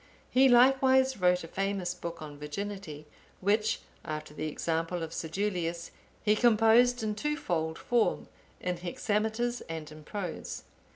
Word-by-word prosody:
He 265 +1 +6
likewise 260 +1 +5
wrote 180 -1 +3
a - - -7
famous 195 0 -2
book 170 -2 -7
on 145 -1 -9
Virginity,(876) 155 -1 -6 0.3
which, 210 +3 +1 0.2
after 155 -2 -5
the 155 +1 -3
example 165 +2 -2
of 160 - -5
Sedulius,(877) 170 0 -2 0.4
he 210 0 +4
composed 235 +1 +5
in 215 -1 0
twofold 175 - -2
form, 240 -2 +1 0.3
in 180 -1 -2
hexameters 220 +7 -1
and 160 -2 -6
in 155 0 -12
prose. 185 0 -5
195 Hz, 130 wpm, -30 LUFS, 165-225 Hz, 0.4 s, He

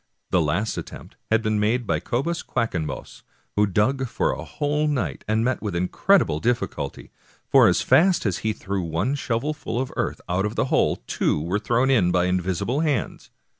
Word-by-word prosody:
The 90 - +3
last 85 +8 -1
attempt - - -10
had 110 0 +2
been 110 -1 +1
made 115 +4 +1
by - - 0
Cobus 165 +8 -2
Quackenbos, 85 - -3 0.3
who 105 0 +3
dug 120 +7 +1
for - - 0
a - - -5
whole 150 +1 -1
night, 145 -4 -2
and 110 +2 +1
met 130 0 0
with 105 -5 -3
incredible 90 - +2
dilBculty, 95 - -2 0.4
for - - +6
as - - +2
fast 180 -3 +4
as 95 -4 0
he 110 - 0
threw 100 -2 -3
one 85 - -1
shovelful 140 0 -2
of 130 0 -3
earth - - -2
out 90 +4 0
of 105 - -6
the - - +1
hole, - - +3
two - - 0
were 90 +7 -1
thrown 120 +5 +1
in 95 -9 +3
by 90 0 +2
invisible 95 - -1
hands. 150 -8 -1
110 Hz, 180 wpm, -24 LUFS, 90-130 Hz, 0.4 s, for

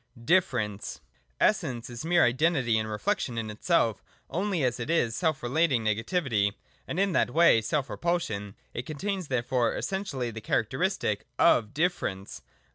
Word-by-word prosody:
(0) 115 -1 -15
Difference. 120 - +1 0.4
116.] - - +5
Essence 120 0 -2
is 120 +3 -6
mere 175 +1 +4
Identity 125 -3 +2
and 110 0 -3
reflection 120 - -1
in 110 -2 -3
itself 115 - +1 0.3
only 185 -3 0
as 125 -2 0
it 120 - -4
is 120 -9 +1
self 160 -6 0
relating 135 -1 +2
negativity, 110 - +1 0.3
and 170 - -3
in 195 0 +2
that - - +2
way 165 -9 +5
self 135 +5 -1
repulsion. 110 - -2 0.2
It 125 - -5
contains 185 +4 -3
therefore 125 -2 0
essentially 165 -12 -3
the 110 0 -8
characteristic 115 - -1
of 110 0 +3
Difference. 100 - -2
125 Hz, 150 wpm, -28 LUFS, 110-170 Hz, 0.4 s, 116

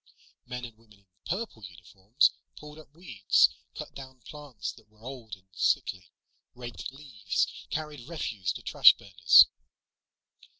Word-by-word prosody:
Men 125 0 -6
and 115 -2 -12
women 105 -3 -23
in 100 - -37 0.2
purple 185 - -4
uniforms 95 - 0 0.3
pulled 150 +1 -12
up 150 -3 -16
weeds, 125 - +2 0.3
cut - - -8
down 130 -2 -12
plants 145 -4 -7
that 105 - -20
were 110 +1 -25
old 120 -5 -8
and 95 0 -27
sickly, 90 +1 -1 0.5
raked 120 +1 -8
leaves, 125 -9 -3
carried 150 -5 -6
refuse 105 - -3
to - - -10
trash - - +6
burners. 90 -3 +6
120 Hz, 135 wpm, -28 LUFS, 100-140 Hz, 0.5 s, trash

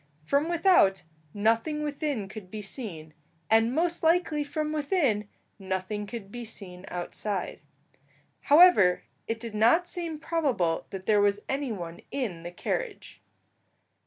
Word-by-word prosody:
From 280 - +1
without, 335 - +4 0.3
nothing 230 - +1
within 285 -7 -2
could 195 -2 -10
be 210 +1 -6
seen, 185 - -6 0.4
and 225 +1 +5
most 335 +5 0
likely 325 -2 +2
from 305 +1 -3
within, 280 - +1 0.3
nothing 190 +2 -3
could 205 -2 -7
be 240 +1 -6
seen 195 -5 -8
outside. 185 +2 -3 0.9
However, 290 - +7 0.2
it 225 0 -2
did 230 -2 -6
not 235 +12 +4
seem 335 -3 -3
probable 275 - 0
that 190 -1 -7
there 210 0 +4
was 205 0 +2
any 270 -2 -2
one 170 -5 -6
in 220 -12 -3
the 170 - -6
carriage. - - -4
225 Hz, 130 wpm, -28 LUFS, 195-300 Hz, 0.9 s, However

